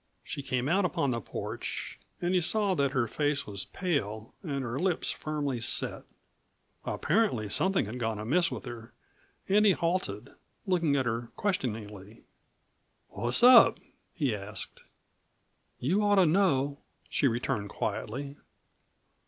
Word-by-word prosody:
She -, -, -5 dB
came 130 Hz, -1 st, -1 dB
out 190 Hz, +6 st, +3 dB
upon 145 Hz, -6 st, 0 dB
the 115 Hz, -1 st, -2 dB
porch, -, -, -5 dB, 0.2 s
and 175 Hz, +1 st, 0 dB
he 180 Hz, -, +3 dB
saw 205 Hz, +3 st, +1 dB
that 140 Hz, -5 st, +1 dB
her 130 Hz, -3 st, 0 dB
face 145 Hz, +3 st, 0 dB
was 100 Hz, -2 st, -5 dB
pale 110 Hz, -, -3 dB
and 140 Hz, -6 st, -3 dB
her 120 Hz, +2 st, -3 dB
lips 180 Hz, -1 st, 0 dB
firmly 145 Hz, -5 st, -3 dB
set. -, -, +2 dB, 0.8 s
Apparently 165 Hz, -, 0 dB
something 190 Hz, -, +1 dB
had 115 Hz, +5 st, -6 dB
gone 115 Hz, -2 st, -1 dB
amiss 160 Hz, +11 st, +1 dB
with -, -, -6 dB
her 120 Hz, -2 st, -9 dB, 0.5 s
and 205 Hz, +2 st, +4 dB
he 205 Hz, -3 st, +6 dB
halted, 165 Hz, -, -2 dB, 0.3 s
looking 170 Hz, -7 st, +2 dB
at 135 Hz, -2 st, +1 dB
her 115 Hz, 0 st, -2 dB
questioningly. 110 Hz, -, -3 dB, 0.9 s
"What's 120 Hz, -, +1 dB
up?" 245 Hz, -1 st, +8 dB, 0.4 s
he 140 Hz, -7 st, 0 dB
asked. 100 Hz, -1 st, -7 dB, 1.0 s
"You 180 Hz, +11 st, +1 dB
ought 205 Hz, -1 st, +3 dB
to 190 Hz, -2 st, +5 dB
know," 145 Hz, -6 st, +2 dB, 0.3 s
she 140 Hz, -, +1 dB
returned 115 Hz, -4 st, -1 dB
quietly. 140 Hz, +10 st, -4 dB
140 Hz, 135 wpm, -29 LUFS, 115-180 Hz, 1.0 s, up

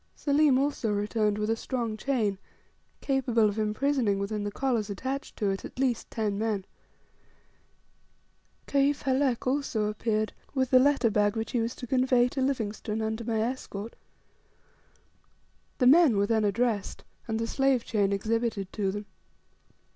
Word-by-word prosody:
Selim 290 Hz, -2 st, +3 dB
also 270 Hz, -5 st, 0 dB
returned 210 Hz, 0 st, 0 dB
with 210 Hz, 0 st, -1 dB
a -, -, +2 dB
strong 230 Hz, -2 st, -3 dB
chain, 215 Hz, -5 st, -1 dB, 0.6 s
capable 245 Hz, -5 st, +2 dB
of 205 Hz, +1 st, -2 dB
imprisoning 215 Hz, 0 st, +1 dB
within 205 Hz, +1 st, -3 dB
the 205 Hz, -, -3 dB
collars 235 Hz, -4 st, -1 dB
attached 260 Hz, +7 st, -4 dB
to 205 Hz, -3 st, 0 dB
it 195 Hz, -, -4 dB
at -, -, -10 dB
least 255 Hz, -3 st, 0 dB
ten 210 Hz, -3 st, -2 dB
men. 215 Hz, -4 st, -1 dB, 2.0 s
Kaif 280 Hz, 0 st, +1 dB
Halek 265 Hz, -2 st, +1 dB
also 255 Hz, -5 st, 0 dB
appeared 215 Hz, 0 st, -1 dB, 0.2 s
with 260 Hz, -1 st, 0 dB
the 255 Hz, -, +7 dB
letter 270 Hz, -4 st, +3 dB
bag 205 Hz, 0 st, +2 dB
which 225 Hz, 0 st, -3 dB
he 245 Hz, -, 0 dB
was 230 Hz, +2 st, -2 dB
to 250 Hz, -, -7 dB
convey 255 Hz, 0 st, +3 dB
to 270 Hz, -, -3 dB
Livingstone 220 Hz, -4 st, -2 dB
under 220 Hz, +1 st, -2 dB
my 220 Hz, -1 st, -1 dB
escort. 230 Hz, -3 st, -4 dB, 1.8 s
The 250 Hz, -, +2 dB
men 280 Hz, -4 st, +6 dB
were 200 Hz, -, +3 dB
then 220 Hz, 0 st, +1 dB
addressed, 210 Hz, 0 st, -1 dB, 0.2 s
and 220 Hz, -1 st, -1 dB
the 230 Hz, -, -1 dB
slave 270 Hz, 0 st, +1 dB
chain 200 Hz, -3 st, +1 dB
exhibited 215 Hz, -1 st, -1 dB
to 195 Hz, -3 st, -1 dB
them. 205 Hz, +1 st, -6 dB
225 Hz, 150 wpm, -28 LUFS, 210-260 Hz, 2.0 s, the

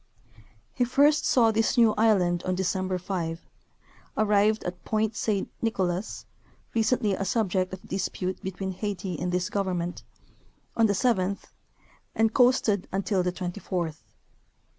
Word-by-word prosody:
He 250 Hz, -, +1 dB
first 285 Hz, +5 st, +3 dB
saw 230 Hz, -3 st, +4 dB
this 225 Hz, +3 st, +1 dB
new 230 Hz, -2 st, +6 dB
island 190 Hz, -6 st, +3 dB
on 185 Hz, -, -1 dB
December 185 Hz, 0 st, -1 dB
5; 175 Hz, -2 st, -4 dB, 0.7 s
arrived 215 Hz, 0 st, +3 dB
at 180 Hz, 0 st, -6 dB
Point 215 Hz, 0 st, 0 dB
Saint 205 Hz, -4 st, -1 dB
Nicolas 190 Hz, -3 st, -2 dB, 0.5 s
(recently 220 Hz, -2 st, +2 dB
a 195 Hz, -, -2 dB
subject 190 Hz, -3 st, 0 dB
of 190 Hz, 0 st, -9 dB
dispute 185 Hz, 0 st, -3 dB
between 190 Hz, 0 st, -4 dB
Haiti 190 Hz, -2 st, -4 dB
and 180 Hz, 0 st, -2 dB
this 180 Hz, 0 st, 0 dB
government) 180 Hz, -4 st, -2 dB, 0.7 s
on 225 Hz, -1 st, +4 dB
the 200 Hz, -, +1 dB
seventh, 200 Hz, -4 st, 0 dB, 0.6 s
and 225 Hz, 0 st, +2 dB
coasted 245 Hz, -6 st, +3 dB
until 195 Hz, 0 st, 0 dB
the 180 Hz, 0 st, 0 dB
twenty 180 Hz, +1 st, -5 dB
fourth. 170 Hz, -4 st, -3 dB
195 Hz, 135 wpm, -27 LUFS, 180-220 Hz, 0.7 s, new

